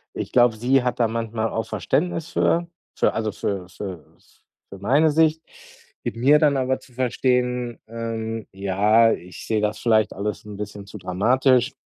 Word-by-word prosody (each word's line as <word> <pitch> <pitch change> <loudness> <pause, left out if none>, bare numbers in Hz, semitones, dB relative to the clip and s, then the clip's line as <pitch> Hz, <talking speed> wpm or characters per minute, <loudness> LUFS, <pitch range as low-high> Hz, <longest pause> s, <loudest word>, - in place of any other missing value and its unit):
Ich - - -4
glaube, 120 -2 +4
sie 125 +4 +2
hat 125 -1 -2
da 115 - +4
manchmal 115 0 -2
auch 110 - -2
Verständnis 155 - -1
für 170 +1 +1 0.3
also 110 -1 +1
für 95 -2 -3
für 90 -3 -8 0.6
für 100 - -9
meine 140 +11 +3
Sicht, 160 +1 +3 0.6
gibt - - -3
mir 140 +6 +5
dann 150 -2 +3
aber 130 0 0
zu 125 - -20
verstehen, 125 -1 0
ähm, 115 -1 -4
ja, 105 +4 +3
ich 90 -3 -6
sehe 110 -1 +1
das 105 0 -1
vielleicht 110 -2 +2
alles 105 0 -4
'n 105 -1 -8
bisschen 105 0 -7
zu 105 +1 -10
dramatisch 125 +8 +2
115 Hz, 160 wpm, -23 LUFS, 105-130 Hz, 0.6 s, mir